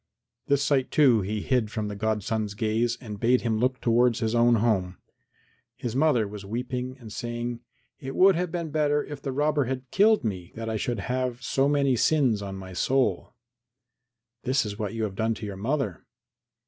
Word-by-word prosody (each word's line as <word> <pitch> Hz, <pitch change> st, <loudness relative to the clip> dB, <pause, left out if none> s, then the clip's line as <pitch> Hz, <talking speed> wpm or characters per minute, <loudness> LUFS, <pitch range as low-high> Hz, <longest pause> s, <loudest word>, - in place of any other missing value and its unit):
This 140 Hz, 0 st, +2 dB
sight, 140 Hz, -3 st, +1 dB
too, 130 Hz, -8 st, +4 dB
he 105 Hz, +2 st, -3 dB
hid 125 Hz, -4 st, +1 dB
from 110 Hz, -1 st, -3 dB
the 105 Hz, -, -5 dB
godson's 110 Hz, 0 st, -1 dB
gaze 115 Hz, +2 st, 0 dB
and 105 Hz, -5 st, -8 dB
bade 125 Hz, +3 st, +3 dB
him 110 Hz, -2 st, 0 dB
look 125 Hz, +2 st, +1 dB
towards 120 Hz, 0 st, +3 dB
his 110 Hz, 0 st, -1 dB
own 120 Hz, 0 st, +4 dB
home. 100 Hz, -5 st, 0 dB, 0.8 s
His 120 Hz, -1 st, -4 dB
mother 135 Hz, -7 st, +3 dB
was 100 Hz, 0 st, -8 dB
weeping 125 Hz, +4 st, -4 dB
and 110 Hz, -4 st, -10 dB
saying, 120 Hz, +1 st, -4 dB, 0.4 s
"It 135 Hz, 0 st, -6 dB
would 195 Hz, +1 st, +6 dB
have 175 Hz, 0 st, -1 dB
been 170 Hz, -3 st, -3 dB
better 150 Hz, -1 st, +1 dB
if 145 Hz, -2 st, -8 dB
the 135 Hz, -, -3 dB
robber 145 Hz, +1 st, +1 dB
had 130 Hz, 0 st, -5 dB
killed 215 Hz, -3 st, +4 dB
me 95 Hz, -5 st, -4 dB
than 115 Hz, -, -5 dB
that -, -, -3 dB
I -, -, -2 dB
should 115 Hz, -1 st, -2 dB
have 125 Hz, +2 st, -2 dB
so 135 Hz, +1 st, +1 dB
many 140 Hz, -3 st, +2 dB
sins 120 Hz, -3 st, +2 dB
on 100 Hz, -1 st, -5 dB
my 95 Hz, -1 st, -8 dB
soul." 130 Hz, +6 st, 0 dB, 1.1 s
"This 130 Hz, -1 st, +1 dB
is 105 Hz, +1 st, -6 dB
what 105 Hz, +1 st, -3 dB
you 115 Hz, -, -2 dB
have 105 Hz, -3 st, -2 dB
done 110 Hz, +3 st, 0 dB
to 110 Hz, -, -7 dB
your 100 Hz, -2 st, -5 dB
mother." 115 Hz, -, -2 dB
120 Hz, 195 wpm, -26 LUFS, 110-135 Hz, 1.1 s, would